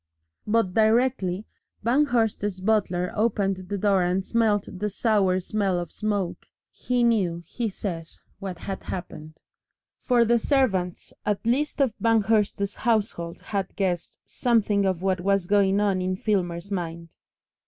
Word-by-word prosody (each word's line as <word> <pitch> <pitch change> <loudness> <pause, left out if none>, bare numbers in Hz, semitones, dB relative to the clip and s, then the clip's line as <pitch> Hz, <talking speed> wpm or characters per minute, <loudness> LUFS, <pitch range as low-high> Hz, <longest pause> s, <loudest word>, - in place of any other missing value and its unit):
But 210 -4 +2
directly 220 -3 +2 0.4
Banghurst's 230 -7 +1
butler 185 -3 +1
opened 205 -3 +1
the 205 - -1
door 195 -1 +3
and 180 +2 0
smelt 220 -3 +1
the 210 +1 -1
sour 200 -3 +2
smell 195 0 -1
of 175 -2 -3
the - - -18
smoke, 205 -4 -2 0.2
he 250 -1 -1
knew, 185 -8 +1
he 235 -3 -3
says, 170 -5 -6 0.2
what 190 -3 -5
had 195 +2 -5
happened. 155 -4 -7 0.7
For 240 -2 +3
the 235 +1 +3
servants 205 - 0
at 210 +1 -1
least 280 +6 0
of 260 -6 +2
Banghurst's 215 -3 +2
household 205 -7 -1
had 195 -2 -3
guessed 180 -3 -2
something 210 -5 +1
of 185 -1 -1
what 190 -1 +1
was 195 -1 +1
going 200 0 +3
on 200 -3 +1
in 185 0 -1
Filmer's 185 -2 -1
mind. 170 -3 -5
200 Hz, 140 wpm, -25 LUFS, 185-220 Hz, 0.7 s, door